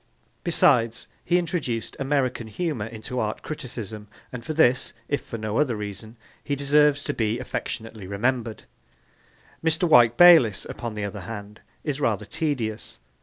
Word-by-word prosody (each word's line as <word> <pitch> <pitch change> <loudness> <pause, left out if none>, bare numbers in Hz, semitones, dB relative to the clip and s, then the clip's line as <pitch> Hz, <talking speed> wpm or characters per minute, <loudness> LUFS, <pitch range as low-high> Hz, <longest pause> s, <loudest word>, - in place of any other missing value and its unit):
Besides, 120 -9 +3 0.2
he 175 - +2
introduced 155 -10 -2
American 135 -4 0
humour 130 -3 -3
into 115 +2 -5
art 110 -1 -2
criticism, 110 -8 -6 0.2
and 125 -2 -7
for 155 - -4
this, 130 -5 +3
if 145 - -1
for 115 - -6
no 110 0 -2
other 135 -6 +2
reason, 105 +2 -7 0.3
he 145 - -1
deserves 145 +1 +3
to - - -2
be 110 0 0
affectionately 115 -4 -5
remembered. 115 +3 -1 1.0
Mr. 165 +2 +2
Wyke 120 -6 +6
Bayliss, 160 - +7
upon 115 -2 -6
the 105 -1 -3
other 100 0 -6
hand, 105 -2 -8 0.2
is 145 -2 -2
rather 110 -7 0
tedious. 130 - -3
120 Hz, 145 wpm, -25 LUFS, 110-145 Hz, 1.0 s, Bayliss